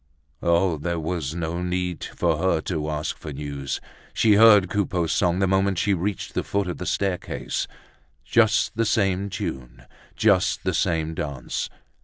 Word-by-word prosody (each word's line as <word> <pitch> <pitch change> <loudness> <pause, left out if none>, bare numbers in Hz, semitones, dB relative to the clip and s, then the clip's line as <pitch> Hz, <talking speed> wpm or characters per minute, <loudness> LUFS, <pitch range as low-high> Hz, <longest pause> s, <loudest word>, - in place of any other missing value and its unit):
Oh! 85 -1 +2
there 85 +2 -2
was 80 -2 -3
no 85 +1 -3
need 90 0 -2
for 85 -3 -1
her 90 -2 +2
to 80 -4 -3
ask 75 0 -2
for 75 - -7
news. 70 -1 -4 0.4
She 110 -2 +4
heard 105 -2 +7
Coupeau's 90 -4 0
song 90 +1 +2
the 95 - +2
moment 95 0 +2
she 100 +3 +2
reached 95 +1 -3
the - - -1
foot 100 -2 -1
of 90 - -4
the 90 - -4
staircase. 95 -3 -2 0.6
Just 110 - +3
the 115 +1 +1
same 100 -2 +1
tune, 65 -9 -6 0.3
just - - +2
the - - 0
same 80 -3 0
dance. 70 -4 -4
90 Hz, 160 wpm, -24 LUFS, 80-95 Hz, 0.6 s, heard